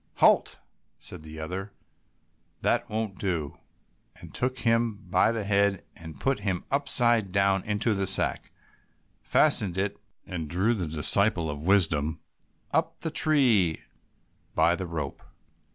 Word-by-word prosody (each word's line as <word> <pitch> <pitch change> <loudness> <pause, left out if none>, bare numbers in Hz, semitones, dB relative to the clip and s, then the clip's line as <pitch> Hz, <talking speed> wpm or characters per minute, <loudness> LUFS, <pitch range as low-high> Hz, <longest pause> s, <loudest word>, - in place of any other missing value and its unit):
"Halt!" - - +3 0.4
said - - -9
the 80 0 -10
other, 95 +6 -6 0.9
"that - - 0
won't 110 -3 -4
do," 85 -7 -3 0.6
and - - -12
took 130 +1 -2
him 115 -1 +1
by 95 +1 +1
the 115 -2 -3
head 100 -1 +1
and 80 -1 -10
put 135 -3 0
him 95 -3 -3
upside 120 -7 +2
down 95 0 +2
into 105 +2 0
the 95 -1 -1
sack, 95 - +1 0.7
fastened 95 -4 +3
it, 100 +1 -2 0.3
and 85 -5 -5
drew 95 +8 +1
the 95 -7 -3
disciple 80 +2 +2
of 75 0 -7
wisdom 80 -5 +2 0.5
up - - -1
the 160 - -3
tree 125 - +3 0.7
by 85 +1 +3
the 95 0 -5
rope. 75 -5 -5
100 Hz, 135 wpm, -27 LUFS, 85-110 Hz, 0.9 s, Halt